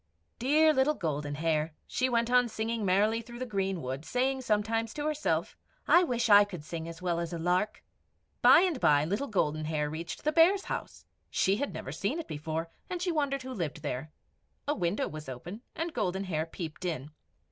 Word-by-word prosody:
Dear 310 +5 +4
little 290 +2 +3
Golden 145 - -2
Hair, 155 0 0
she 255 0 0
went 235 0 +1
on 250 -1 +4
singing 225 0 -2
merrily 205 +4 +3
through 240 +1 -10
the 255 - -3
greenwood, 190 - -2
saying 260 +9 0
sometimes 225 0 0
to 295 -1 -3
herself 305 -1 0 0.3
"I 350 - +7
wish 240 -8 0
I 205 -1 +8
could 180 -7 -7
sing 165 +1 -5
as 165 +1 -9
well 170 -2 0
as 170 -1 -2
the 170 - -4
lark!" 180 +5 0 0.6
By - - +8
and 355 -7 +1
by 145 0 +4
Little 205 - -1
Golden 155 - 0
Hair 150 -1 -1
reached 165 +2 -6
the 305 - +2
Bears' 345 +5 +5
house. - - -5 0.2
She 195 +1 +2
had 285 +4 -2
never 135 - -6
seen 200 - -2
it 335 - -5
before, 160 +2 -4 0.2
and 360 - -3
she 360 0 0
wondered 280 -4 0
who 260 0 -6
lived 160 - -4
there. 145 +2 -4 0.6
A 295 - +2
window 175 - 0
was 155 -2 -8
open, 175 - -7
and 330 0 -3
Golden 190 +2 -1
Hair 160 -4 -2
peeped 165 0 -7
in. 155 -5 -3
200 Hz, 195 wpm, -30 LUFS, 160-255 Hz, 0.6 s, I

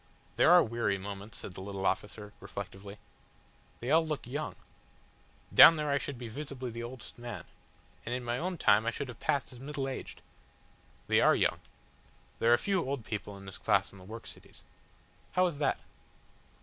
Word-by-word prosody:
"There - - +5
are - - +8
weary 115 -3 0
moments," 100 +2 -7
said 90 - -6
the 95 - -8
little 95 0 -5
officer, 105 0 -2
reflectively. 100 +1 -8 0.8
"They 120 +3 -2
all 160 +1 +6
look 155 -3 -3
young. 145 +5 -4 1.0
Down 165 - +11
there 150 -2 -1
I 140 - +2
should 140 -2 -5
be 120 -1 -6
visibly 130 0 -6
the 115 +1 -6
oldest 120 0 -9
man. 120 -8 -6 0.6
And 120 - -2
in 125 - -4
my 120 +1 -1
own 180 +2 -2
time 110 -5 +4
I - - +5
should 130 +3 -4
have 120 - -9
passed 140 -4 0
as 125 - -11
middle 140 0 -3
aged." 135 - -6 0.8
"They - - +4
are - - +6
young. - - +2 0.8
There 115 - +4
are 120 - +7
few 195 +1 0
old 135 -4 -3
people 105 -2 -5
in 100 - -12
this 95 - -9
class 100 -3 +2
in 100 - -14
the - - -13
work 110 +4 -9
cities." - - -12 0.7
"How 185 - +4
is 165 -5 -2
that?" 150 - +2
120 Hz, 190 wpm, -31 LUFS, 105-140 Hz, 1.0 s, Down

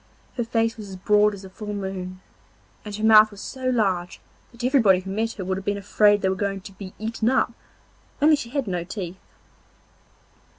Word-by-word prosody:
Her 240 - -1
face 225 0 0
was 210 -2 -8
as 190 - -7
broad 210 +2 +3
as 195 -1 -11
a - - -10
full 210 +1 -6
moon, 185 -2 -5 0.6
and 210 -1 -6
her 215 - -5
mouth 215 -1 +8
was 205 -2 -13
so 260 +4 -4
large 190 -8 0 0.3
that 240 0 -11
everybody 235 -8 +4
who 190 +1 -7
met 225 +3 -1
her 190 - -6
would 190 +1 -1
have - - -11
been 205 0 0
afraid 205 +1 +3
they 190 - +3
were - - +1
going 195 0 -2
to 195 - -10
be 190 -1 -10
eaten 225 +1 -1
up, 260 -2 +1 0.7
only 305 +2 +6
she 260 -5 -6
had 275 0 -2
no 180 -4 -2
teeth. 185 0 -6
205 Hz, 205 wpm, -24 LUFS, 190-225 Hz, 0.7 s, mouth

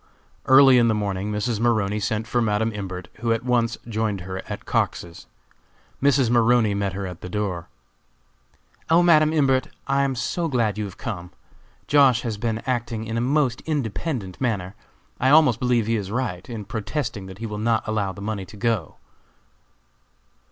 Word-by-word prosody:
Early 130 -1 +7
in 120 - +4
the 110 - +2
morning 100 -1 -2
Mrs. 105 +1 -1
Maroney 110 -3 +1
sent 110 +1 -1
for 120 +1 0
Madam 110 0 +1
Imbert, 95 -3 -6
who 115 0 0
at 115 +2 -1
once 120 -2 +1
joined 110 -3 -1
her 95 +1 -5
at - - -6
Cox's. 85 -1 -2 0.7
Mrs. 135 -2 +3
Maroney 120 -2 +4
met 100 -1 -1
her 100 0 -4
at 90 -2 -8
the 90 - -7
door. 95 -4 -3 1.2
"O, 165 +2 +5
Madam 155 -3 +5
Imbert, 135 -4 +2 0.2
I 135 0 +1
am 135 -1 0
so 165 +8 -2
glad 120 -8 0
you 105 - -1
have 95 - -9
come! 90 -6 -5 0.6
Josh. 135 -5 +4
has 115 -4 -3
been 115 +1 -2
acting 120 -3 -2
in 110 +1 -4
a 115 - 0
most 130 -1 +1
independent 130 - -3
manner. 100 -7 -1 0.5
I 130 - +3
almost 145 -6 +5
believe 125 -3 +2
he 115 +1 +1
is 100 -3 -4
right, 115 -5 -3
in 110 -4 -6
protesting 110 -1 -4
that 95 0 -10
he 115 - -6
will 105 -1 -5
not 110 0 0
allow 105 -3 -1
the 100 +2 -9
money 105 -2 -3
to 100 - -12
go." 110 -7 -1
115 Hz, 175 wpm, -23 LUFS, 100-125 Hz, 1.2 s, Early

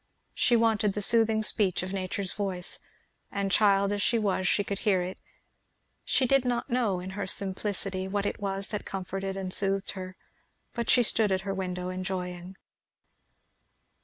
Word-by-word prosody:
She 240 - +3
wanted 220 -3 +2
the 210 - -3
soothing 225 -1 +3
speech 200 -5 +1
of 185 +1 -5
nature's 190 0 -2
voice; 190 -3 -3 0.5
and 200 -1 -1
child 200 -1 +4
as 205 0 -1
she 235 - +2
was 195 -4 0
she 205 - +2
could 200 0 -4
hear 190 -5 +2
it. 185 +1 -6 0.8
She 265 - +2
did 275 +1 +3
not 245 +1 -2
know, 230 -7 +1
in 185 +1 -6
her 195 0 -4
simplicity, 190 0 +1
what 200 +1 -1
it - - -2
was 195 -1 -2
that 210 - -3
comforted 195 +1 -4
and 185 -1 -3
soothed 195 0 +1
her, 185 -1 -7 0.6
but 235 -2 -3
she 245 - +6
stood 215 -2 +2
at 190 0 +1
her 195 0 -3
window 180 -1 -3
enjoying. 185 -1 -5
195 Hz, 165 wpm, -28 LUFS, 185-210 Hz, 0.8 s, she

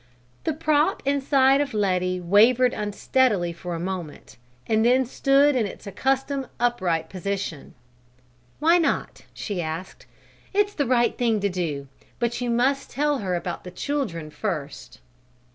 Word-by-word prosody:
The 320 - +1
prop 310 +3 +1
inside 275 0 +3
of 280 -5 -3
Letty 185 -3 +1
wavered 230 +8 +4
unsteadily 210 -3 +1
for 175 0 -6
a - - -4
moment 175 -4 -6 0.3
and 220 0 +2
then 255 +2 +4
stood 275 +3 +3
in 230 -5 +1
its 200 - -11
accustomed 270 +6 -1
upright 185 -10 0
position. 190 -4 -5 0.8
"Why 335 +4 +4
not?" 330 - -1
she 195 -4 -3
asked. 160 +3 -6 0.5
"It's 410 0 +2
the 285 -7 -1
right 240 -1 +2
thing 230 -4 +1
to 200 - +1
do; 160 -7 -3 0.3
but 240 0 -1
you 245 - -1
must 255 +4 +1
tell 290 +1 0
her 185 -3 -1
about 175 0 -4
the 180 - -7
children 180 - -3
first." 145 - -5
225 Hz, 145 wpm, -24 LUFS, 180-270 Hz, 0.8 s, wavered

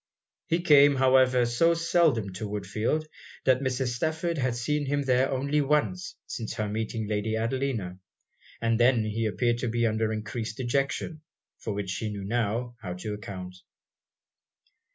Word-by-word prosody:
He 170 0 +1
came, 145 -3 +7
however, 130 -1 +4
so 165 +9 +3
seldom 165 - +2
to 105 +3 -5
Woodfield, 105 +9 -1 0.4
that 130 -1 +4
Mrs. 130 -1 -1
Stafford 160 +5 -1
had 125 -2 0
seen 145 +4 -1
him 145 +1 0
there 130 0 +2
only 140 +3 +1
once 150 +6 0
since 115 -2 -5
her 105 - -2
meeting 110 +1 -3
Lady 110 +1 -1
Adelina; 115 -6 -2 0.6
and 115 0 +1
then 120 -2 +4
he 110 +1 -1
appeared 120 +2 0
to 125 - -1
be 120 +1 +1
under 110 0 +1
encreased 110 +1 -4
dejection, 140 +5 -1 0.4
for 110 - -4
which 100 -2 -3
she 110 +3 -3
knew 100 -1 -5
now, 120 +3 -1
how 90 -4 -4
to 100 +4 -5
account. 95 -3 -7
120 Hz, 155 wpm, -27 LUFS, 110-140 Hz, 0.6 s, came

